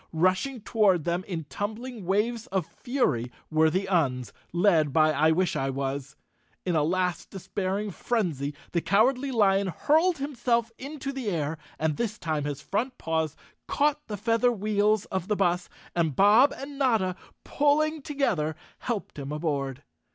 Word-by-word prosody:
Rushing 185 +10 +1
toward 200 -7 +3
them 175 +2 -1
in 170 -5 -3
tumbling 215 - -5
waves 225 +5 0
of 190 -8 -1
fury 165 - -1 0.2
were 160 0 +4
the 185 +4 0
Uns, 135 -10 0 0.2
led 170 -5 +3
by 155 +2 +4
I 155 +2 +4
wish 175 +2 +2
I 135 0 0
was. 135 +1 -3 0.5
In 180 -2 +1
a 155 - +4
last 180 +3 0
despair¬ 190 +1 -3
ing 210 - -4
frenzy, 165 - -1 0.2
the 170 - +1
Cowardly 250 +9 +2
Lion 200 -5 +3
hurled 315 - +2
himself 240 -4 0
into 275 0 -5
the 265 -5 -3
air, 160 -3 -2 0.2
and 155 -1 0
this 230 -2 -2
time 155 -6 -2
his 145 0 -4
front 245 +5 -2
paws 160 -2 -1 0.3
caught 295 +1 +1
the 210 - -4
feather 230 +4 +2
wheels 210 -1 +1
of 190 -1 -1
the 210 - +1
bus, 180 -2 +1 0.3
and 165 -5 +1
Bob 215 - +6
and 275 +1 -8
Notta, 220 -9 +2 0.3
pulling 305 +2 +2
together, 210 - 0 0.2
helped 220 - -4
him 140 0 -5
aboard. 145 -3 -2
195 Hz, 160 wpm, -27 LUFS, 160-235 Hz, 0.5 s, Bob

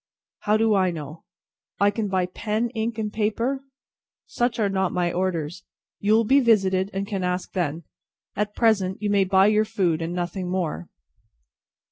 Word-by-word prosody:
"How 210 +1 +2
do 220 0 +3
I 190 -2 +3
know!" 155 -1 -7 0.5
"I 200 0 +4
can 210 0 -2
buy 190 -2 +1
pen, 215 +5 -2
ink, 225 -1 -3
and 215 -1 -3
paper?" 230 +5 -1 0.6
"Such 240 0 -1
are 215 -3 +2
not 190 -2 0
my 175 -1 0
orders. 175 -2 -2 0.4
You 205 +2 +2
will 225 +1 +5
be 270 +6 +4
visited, 195 -6 +3
and 195 0 -3
can 200 -3 -3
ask 180 0 -2
then. 170 -3 -2 0.5
At 210 +1 -2
present, 200 -5 +2
you 210 -1 -1
may 200 -1 +3
buy 190 +1 +4
your 215 +1 +4
food, 190 -7 0
and 165 +1 -3
nothing 180 +1 -3
more." 180 -2 -3
195 Hz, 170 wpm, -24 LUFS, 180-215 Hz, 0.6 s, will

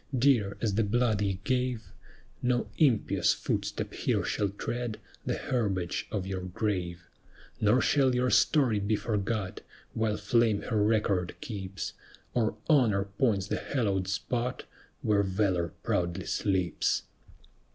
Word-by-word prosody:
Dear 115 -7 +3
as 110 -4 +1
the 110 +3 +2
blood 110 0 +1
ye 95 -2 0
gave, 125 -5 -1 0.5
No 125 -1 +1
impious 130 -9 +3
footstep - - -2
here - - 0
shall 100 -1 0
tread 120 +3 -4 0.3
The - - +1
herbage 95 -8 -1
of 100 -4 -2
your 95 -1 -3
grave; 90 -2 -3 0.5
Nor 110 +5 +4
shall 135 -3 +3
your 125 0 +2
story 130 -9 +4
be 100 +2 +1
forgot, 105 -2 -2 0.3
While 110 -2 0
Fame 110 0 +2
her 110 -4 0
record 105 -4 +1
keeps, 95 -3 -5 0.4
Or 110 -3 +1
Honor 115 -10 +4 0.2
points 105 -8 +2
the - - -2
hallowed 100 -8 -1
spot 125 +5 -2 0.4
Where 105 -2 +3
Valor 95 -3 +1 0.2
proudly 85 -1 -1
sleeps. 95 -4 0
105 Hz, 130 wpm, -29 LUFS, 95-120 Hz, 0.5 s, Nor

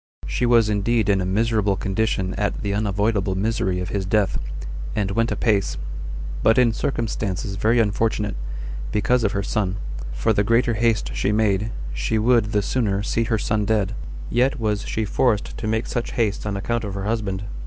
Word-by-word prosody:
She 125 - 0
was 115 -2 +5
indeed 105 +1 +1
in 100 -2 +3
a 90 - -1
miserable 105 0 +2
condition 95 0 -1
at 105 +1 -2
the 100 -1 -1
unavoidable 100 -1 0
misery 95 -2 0
of 90 +1 -3
his 100 -1 -1
death, 100 +1 +1 0.6
and 100 -3 0
went 115 +3 +1
apace, 100 -10 +1 0.6
but 115 +2 +4
in 120 -3 +5
circumstances 105 -6 -2
very 110 +4 +3
unfortunate, 105 - +1 0.6
because 115 +3 +2
of 105 - +1
her 100 - -1
son: 100 -2 -1 0.4
for - - +1
the 100 - +2
greater 115 +2 +3
haste 115 0 +1
she - - 0
made, 105 0 +1 0.2
she - - 0
would 115 0 +4
the 105 -1 0
sooner 100 -4 0
see 115 +2 0
her 115 -1 +1
son 105 0 0
dead, 105 -1 +1 0.4
yet 130 +4 +2
was 105 -2 -1
she 110 - -1
forced 105 0 +1
to 110 - -3
make 110 +1 0
such 120 - -3
haste 105 -3 0
on 100 -1 -1
account 115 +4 -1
of 100 -2 -4
her 100 - -3
husband. 105 -3 -1
105 Hz, 180 wpm, -23 LUFS, 100-115 Hz, 0.6 s, was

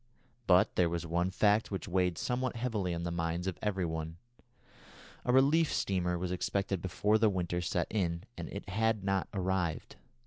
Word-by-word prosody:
But 90 0 +4
there 90 -2 +4
was 85 0 -3
one 85 +2 0
fact 105 +3 +2
which 95 -1 -4
weighed 90 -2 +1
somewhat 130 0 -1
heavily 110 -6 -1
on 85 - -4
the 85 - -2
minds 85 +1 -2
of 95 -2 -3
every 95 -4 0
one. 80 0 -4 1.1
A 125 - +1
relief 145 +5 +4
steamer 90 -2 0
was 90 +1 -3
expected 95 0 -1
before 105 +4 +1
the 110 -1 +4
winter 90 -2 -1
set 85 - 0
in, 85 -5 -1
and - - -6
it 100 - -7
had 110 +1 0
not 95 -1 0
arrived. 95 -4 -2
95 Hz, 175 wpm, -32 LUFS, 85-105 Hz, 1.1 s, But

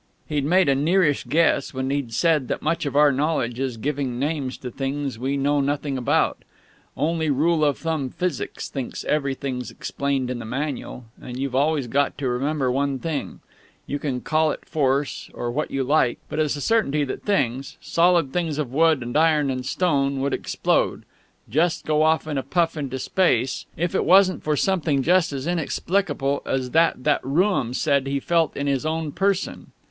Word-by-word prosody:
He'd 145 -3 -1
made 180 +4 +4
a 140 - +4
nearish 150 +1 +2
guess 140 0 +1
when 130 +1 -2
he'd 140 -4 -2
said 150 +1 +2
that - - -3
much 160 -1 0
of 140 - -4
our 145 0 +6
knowledge 135 -4 -1
is 130 -3 -2
giving 135 0 -2
names 140 -1 -2
to 125 - -7
things 135 -1 -3
we 135 +3 -1
know 145 +1 +2
nothing 145 0 -1
about; 125 -2 +1 0.5
only 160 0 0
rule 155 +3 +2
of 145 -2 +2
thumb 160 -5 -2
Physics 180 +6 -3
thinks 135 -3 -5
everything's 135 -3 -2
explained 135 -2 -2
in 125 - -4
the - - -6
Manual; 130 0 -4 0.2
and 125 0 -7
you've 135 -1 -3
always 145 +1 +1
got 140 +4 0
to 140 -2 -2
remember 130 +2 0
one 140 +1 0
thing: 150 +2 -4 0.4
You 145 - -3
can 130 -4 -3
call 155 0 +2
it - - -5
Force 140 -2 -1
or 120 - -3
what 150 +5 -2
you 135 -1 -1
like, 130 -2 +2
but - - -3
it's 150 -2 +1
a 145 - -6
certainty 150 -8 +2
that 135 - -4
things, 140 - -1
solid 170 -5 +2
things 165 -4 -1
of 140 -5 -3
wood 160 -3 +3
and 120 0 -6
iron 155 -3 +3
and 130 -1 -3
stone, 140 -3 0
would 140 +1 0
explode, - - 0 0.4
just 160 +8 +1
go 155 0 +2
off 160 0 +3
in 150 -3 -2
a - - -1
puff 165 +4 0
into 135 -4 -4
space, 130 -5 +1
if 175 +1 -1
it - - +1
wasn't 185 +2 +5
for 150 -1 0
something 160 -8 +1
just 180 +1 +3
as 135 -1 -4
inexplicable 165 -3 -1
as 130 -1 -2
that 165 -5 +2
that 150 0 +2
Rooum 140 - +1
said 140 -2 +1
he 140 0 0
felt 165 +2 +1
in 140 - -2
his 140 -2 0
own 160 -1 -2
person. 195 +3 -1
145 Hz, 185 wpm, -23 LUFS, 135-160 Hz, 0.5 s, our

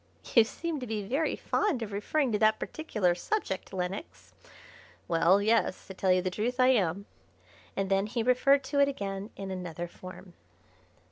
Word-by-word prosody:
'" - - -14
"You 230 - +9
seem 315 +7 -4
to 250 - -6
be 215 -2 -3
very 275 +10 0
fond 305 - 0
of 215 - -6
referring 245 +7 0
to 210 - 0
that 220 0 +4
particular 210 - -1
subject, 190 - -3
Lenox." 190 - -5 0.7
"Well, 170 +3 +4
yes; 220 -3 +1
to 190 - -9
tell 185 0 +1
you 180 0 +3
the 185 - -1
truth 240 +6 -2
I 255 0 +6
am," 200 -5 +1 0.7
and 195 0 0
then 195 +1 +1
he 230 +1 -2
referred 270 +3 +4
to 280 +2 -1
it 280 - +6
again 200 -6 -4
in 195 -1 -6
another 175 -2 -5
form. 185 +1 -12
205 Hz, 180 wpm, -29 LUFS, 185-255 Hz, 0.7 s, You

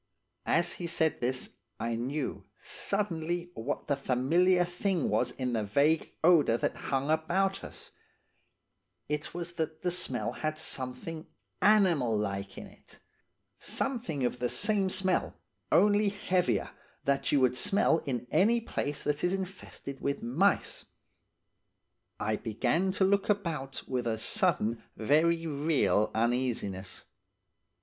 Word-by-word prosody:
"As 175 +1 +3
he 175 - -5
said 160 -2 +1
this 130 +1 -1 0.3
I 115 +1 -1
knew, 135 +5 -3
suddenly, 175 -3 -2
what 130 +3 -4
the 140 - +1
familiar 165 +8 +3
thing 180 -1 -1
was 125 - +1
in 125 -1 -3
the 110 -2 0
vague 145 +10 +2
odour 155 -9 +5
that - - -1
hung 135 +2 +1
about 180 +5 +1
us–it - - -9 1.4
was 175 0 -3
that 160 -1 -4
the 180 - +1
smell 125 -10 -2
had 155 +4 -3
something 155 +1 -5 0.3
animal 175 - +4
like 100 -2 -3
in - - -7
it; - - -16 0.6
something 225 - -2
of 125 0 -2
the 125 - 0
same 205 -2 +1
smell, 185 0 0 0.4
only 205 0 +5
heavier, 180 - 0 0.3
that 140 0 +1
you 145 - +4
would 125 -1 +3
smell 195 0 +3
in 125 -3 -2
any 230 +5 +4
place 145 -10 -3
that 150 0 -1
is 180 +1 +2
infested 190 -7 -6
with 140 0 -2
mice. 165 +13 +1 1.3
I 110 0 0
began 125 - 0
to 195 - +1
look 200 +2 +2
about 165 -10 -1
with 125 -2 -2
a 110 -1 0
sudden 120 - +1 0.2
very 165 +8 +3
real 145 -7 +2
uneasiness. 115 -5 -1
155 Hz, 130 wpm, -30 LUFS, 125-180 Hz, 1.4 s, odour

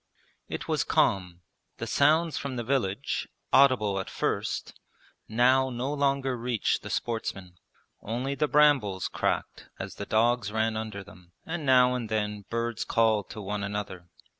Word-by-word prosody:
It - - -5
was - - +1
calm. 90 -2 +1 0.4
The - - -4
sounds 155 +3 +3
from 140 -2 -4
the 120 - -3
village, 125 -1 -1 0.3
audible 120 -8 +4
at 95 - -5
first, - - -2 0.5
now 130 +4 +3
no 130 +3 -3
longer 140 -2 +1
reached 120 -2 -1
the - - -8
sportsmen. 95 -6 -4 0.4
Only 125 +5 -3
the 145 +2 0
brambles 140 -11 +3
cracked - - -2
as - - -6
the - - -6
dogs 115 -1 +2
ran 110 0 0
under 110 -2 -5
them, 90 -3 -17
and 165 -3 -4
now 125 -1 +6
and 120 -3 -3
then 105 -1 -2
birds 115 0 -2
called 110 -3 +2
to 105 - -7
one 100 +1 -3
another. 100 -4 -5
115 Hz, 150 wpm, -28 LUFS, 105-130 Hz, 0.5 s, now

